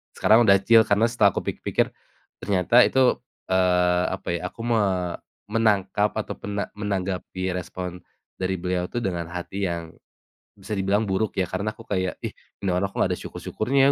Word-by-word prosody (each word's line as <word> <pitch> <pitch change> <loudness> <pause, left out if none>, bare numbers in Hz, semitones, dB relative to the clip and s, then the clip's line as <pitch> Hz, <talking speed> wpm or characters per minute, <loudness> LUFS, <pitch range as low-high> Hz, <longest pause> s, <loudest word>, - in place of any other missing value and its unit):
Sekarang 110 +2 +5
udah 100 -1 +7
chill 115 +2 +6
karena 105 +3 +3
setelah 110 -4 +3
aku - - 0
pikir-pikir, - - -1 0.5
ternyata 100 +5 +4
itu, 130 -1 +3 0.3
eee, 90 -1 +3
apa - - -7
ya, 85 - -1
aku 105 - -15
me 115 -2 +2 0.7
menangkap 105 -2 +2
atau 110 - -3
pena 100 0 -3
menanggapi 95 -2 -3
respon, 90 0 -5 0.4
dari 95 0 -1
beliau 90 0 -1
itu 120 +6 -4
dengan 90 -5 -2
hati 95 +3 -3
yang, 85 -2 -3 0.7
bisa 100 +2 -6
dibilang 100 +2 +1
buruk 100 +2 -1
ya, 95 - +2
karena 100 +4 -2
aku 115 +1 -10
kayak, 95 -5 -2
"Ih, - - -4 0.3
ini - - +1
orang 95 +2 0
kok - - -12
gak - - +2
ada - - -5
syukur-syukurnya 135 +5 +1
100 Hz, 170 wpm, -24 LUFS, 90-110 Hz, 0.7 s, udah